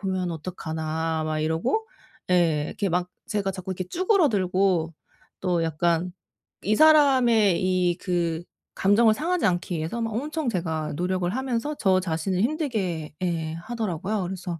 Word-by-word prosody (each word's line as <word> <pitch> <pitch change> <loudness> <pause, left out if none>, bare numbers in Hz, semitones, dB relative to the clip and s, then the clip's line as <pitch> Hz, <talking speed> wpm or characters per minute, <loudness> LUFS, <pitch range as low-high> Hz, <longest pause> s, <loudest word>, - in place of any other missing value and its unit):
보면 185 -3 -1
어떡하나?' 160 -1 -3
막 155 0 -1
이러고 165 - 0 0.4
예. 165 -4 +3
이렇게 200 -2 -2
막 180 +1 -1 0.2
제가 200 -2 -1
자꾸 190 0 -7
이렇게 185 0 -4
쭈그러들고 190 - +2 0.5
또 180 -3 +1
약간 170 +2 0 0.5
이 210 +3 +2
사람의 255 - +5
이 180 -2 +2
그 170 -3 -1 0.3
감정을 215 +3 +4
상하지 335 +3 0
않기 175 -2 0
위해서 165 +10 -3
막 225 -1 -2
엄청 295 +2 -2
제가 160 -6 -2
노력을 180 0 0
하면서 260 +3 -2
저 185 -2 +3
자신을 180 +2 -1
힘들게 215 - -1
예 165 -3 -1
하더라고요. 200 +1 -3
그래서 180 -2 -5
185 Hz, 305 characters per minute, -25 LUFS, 165-220 Hz, 0.5 s, 사람의